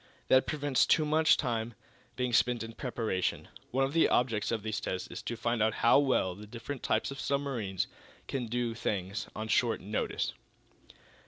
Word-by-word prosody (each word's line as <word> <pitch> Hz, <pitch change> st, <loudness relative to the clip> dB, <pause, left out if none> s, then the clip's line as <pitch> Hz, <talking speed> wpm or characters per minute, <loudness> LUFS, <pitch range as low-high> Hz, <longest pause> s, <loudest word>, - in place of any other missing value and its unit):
That 130 Hz, 0 st, +5 dB
prevents 145 Hz, -4 st, +2 dB
too 155 Hz, -, +4 dB
much 155 Hz, +1 st, +4 dB
time 115 Hz, -4 st, -2 dB, 0.4 s
being 125 Hz, -1 st, -1 dB
spent 120 Hz, 0 st, +3 dB
in 115 Hz, 0 st, -7 dB
preparation. 115 Hz, -8 st, -2 dB, 0.2 s
One 135 Hz, +2 st, +1 dB
of 135 Hz, -, -4 dB
the 165 Hz, -, +4 dB
objects 115 Hz, -4 st, +1 dB
of 110 Hz, -3 st, -1 dB
these 110 Hz, -1 st, -2 dB
tests 95 Hz, -, -3 dB
is -, -, -6 dB
to 120 Hz, -, -4 dB
find 115 Hz, +1 st, 0 dB
out 110 Hz, 0 st, +2 dB
how 120 Hz, -, +7 dB
well 130 Hz, -10 st, +2 dB
the 105 Hz, +3 st, -11 dB
different 120 Hz, +5 st, -6 dB
types -, -, 0 dB
of 135 Hz, -, -7 dB
submarines 125 Hz, -10 st, -1 dB, 0.4 s
can 130 Hz, -3 st, -2 dB
do 120 Hz, 0 st, -1 dB
things 100 Hz, -2 st, -3 dB
on 110 Hz, 0 st, -4 dB
short 115 Hz, 0 st, +2 dB
notice." 105 Hz, +3 st, -2 dB
120 Hz, 175 wpm, -31 LUFS, 110-135 Hz, 0.4 s, how